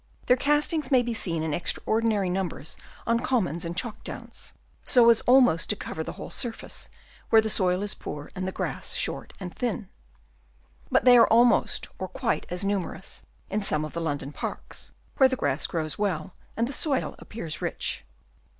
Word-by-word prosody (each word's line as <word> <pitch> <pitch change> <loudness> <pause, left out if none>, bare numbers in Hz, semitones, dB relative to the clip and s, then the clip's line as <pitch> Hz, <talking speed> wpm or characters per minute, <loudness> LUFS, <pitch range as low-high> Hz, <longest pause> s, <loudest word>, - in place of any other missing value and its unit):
Their 250 - +5
castings 295 +2 +1
may 255 -3 +4
be 240 -1 -2
seen 165 -7 -1
in 160 -2 -1
extraordinary 215 +4 +1
numbers 180 -4 -3 0.3
on 230 0 +2
commons 190 -11 0
and 170 +1 -5
chalk 225 -1 -2
downs, - - -9 0.3
so 235 -3 +6
as 230 - +3
almost 245 -10 +5
to 210 - +3
cover 160 - -5
the - - -6
whole - - -8
surface, 235 -2 -4 0.4
where 225 - +7
the 220 0 +1
soil 185 -1 +2
is 205 - -2
poor 145 0 -7
and 185 0 -4
the - - -2
grass - - -3
short - - -2
and 180 -3 -6
thin. 230 -5 -3 1.0
But - - +2
they 250 -1 +9
are 235 - +7
almost 235 +2 +4
or - - -3
quite - - -2
as 180 +3 0
numerous 195 -2 -3 0.3
in 210 +2 -1
some 155 -6 +1
of 155 - -8
the 170 - -3
London 145 -3 -3
parks, - - -7 0.3
where 265 -1 +6
the 260 - 0
grass 145 - 0
grows 155 0 -3
well 185 -4 -1 0.2
and 230 +1 +1
the 275 - -3
soil 280 0 0
appears 170 -9 -6
rich. - - -2
205 Hz, 180 wpm, -26 LUFS, 170-240 Hz, 1.0 s, they